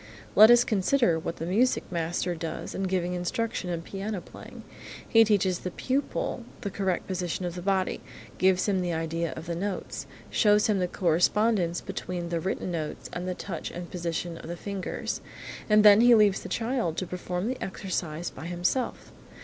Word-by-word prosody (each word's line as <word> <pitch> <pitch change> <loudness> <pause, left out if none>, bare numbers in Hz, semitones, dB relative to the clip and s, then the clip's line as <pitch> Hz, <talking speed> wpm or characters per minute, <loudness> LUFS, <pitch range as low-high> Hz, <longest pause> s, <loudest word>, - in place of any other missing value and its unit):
Let 215 +2 +9
us 240 0 +7
consider 210 -4 +2
what 165 - -4
the 165 - -5
music 225 +9 +2
master 170 +1 -1
does 165 -1 -5
in 195 - -2
giving 180 -1 0
instruction 180 +2 -2
in 170 -1 -3
piano 200 +2 -4
playing. - - -12 0.4
He 225 0 +6
teaches 200 -4 +2
the 180 - -4
pupil 260 +2 -2 0.2
the 200 -4 -3
correct 190 -2 -1
position 180 -1 -3
of 175 - -3
the 180 - -6
body, 190 0 0 0.4
gives 185 +1 +3
him 195 -2 +1
the 175 -1 -1
idea 165 +1 -2
of 160 - -7
the 170 - -3
notes, 195 +2 -4 0.2
shows 210 -1 +4
him 210 -3 +2
the 180 - +1
correspondence 180 +1 +2
between 175 -1 -5
the 170 -1 -1
written 185 +1 -2
notes 155 -3 -4
and 175 +1 -4
the 180 - -2
touch 175 -3 -5
and 175 0 -6
the - - -16
position 170 -1 -3
of - - -10
the 170 +1 -5
fingers, 200 0 -4 0.5
and 210 0 +6
then 205 +1 +9
he 240 0 +7
leaves 210 -3 +4
the - - -8
child 230 -8 -1
to 185 - -1
perform 180 +2 -3
the 255 +1 -3
exercise 175 -4 -3
by 160 - -8
himself. 180 +9 -1
185 Hz, 185 wpm, -27 LUFS, 170-210 Hz, 0.5 s, Let